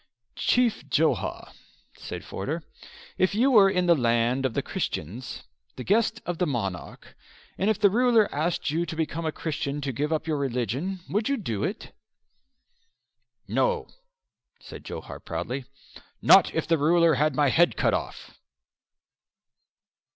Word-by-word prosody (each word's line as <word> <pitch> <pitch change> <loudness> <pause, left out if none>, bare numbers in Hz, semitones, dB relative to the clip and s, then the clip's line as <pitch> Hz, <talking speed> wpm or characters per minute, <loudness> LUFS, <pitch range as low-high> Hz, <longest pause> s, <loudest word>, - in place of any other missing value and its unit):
"Chief 245 -3 +1
Johar," - - 0 0.4
said - - -8
Forder, - - -4 0.6
"if 185 +2 +2
you 255 +5 +3
were 205 -5 +7
in 180 -2 +1
the 175 - +6
land 120 -1 +1
of 115 - -9
the - - 0
Christians, 110 - -5 0.3
the 125 - -6
guest 225 - +1
of 175 -1 -4
the 180 - +1
monarch, 100 -10 -5 0.4
and 195 - 0
if 220 - +2
the 200 -2 +4
ruler 235 -1 +4
asked 155 0 -1
you 165 +3 0
to 160 - -5
become 160 0 -2
a - - 0
Christian 155 -3 -3
and 140 -4 -4
give 150 +4 -1
up 155 -1 -1
your 155 -2 -1
religion 135 - -2
would 215 +5 -1
you 280 - +1
do 110 - -3
it?" 210 - -4 1.5
"No," 485 -2 0 0.7
said - - -11
Johar - - -8
proudly, 130 +1 -5 0.5
"not - - +6
if - - 0
the 165 -2 +1
ruler 165 +2 +4
had 150 +1 +1
my 145 -1 +3
head 175 +5 +3
cut - - +2
off." - - -4
160 Hz, 150 wpm, -26 LUFS, 135-195 Hz, 1.5 s, were